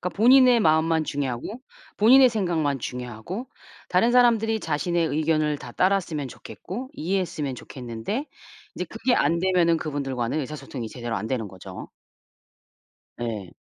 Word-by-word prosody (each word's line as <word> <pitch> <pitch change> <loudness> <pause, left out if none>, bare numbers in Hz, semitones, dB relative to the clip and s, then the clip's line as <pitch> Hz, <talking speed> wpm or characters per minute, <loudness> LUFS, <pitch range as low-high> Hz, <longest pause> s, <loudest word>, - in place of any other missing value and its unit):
그러니까 180 -1 -4
본인의 250 +1 +6
마음만 160 -2 +3
중요하고 145 - -4 0.4
본인의 255 +5 +7
생각만 170 - 0
중요하고 125 - -6 0.4
다른 205 +7 +3
사람들이 225 -3 +3
자신의 165 +1 0
의견을 155 0 +1
다 120 - -10
따랐으면 180 -6 0
좋겠고 190 - -8
이해했으면 170 - -2
좋겠는데 125 - -5 0.5
이제 180 - -3
그게 225 +7 0
안되면은 170 -2 +2
그분들과는 140 -3 -2
의사소통이 135 -4 -6
제대로 120 -1 -4
안 100 +2 -3
되는 120 -4 -2
거죠. 95 -1 -10 1.3
네. 110 -6 -5
160 Hz, 350 characters per minute, -25 LUFS, 130-200 Hz, 1.3 s, 본인의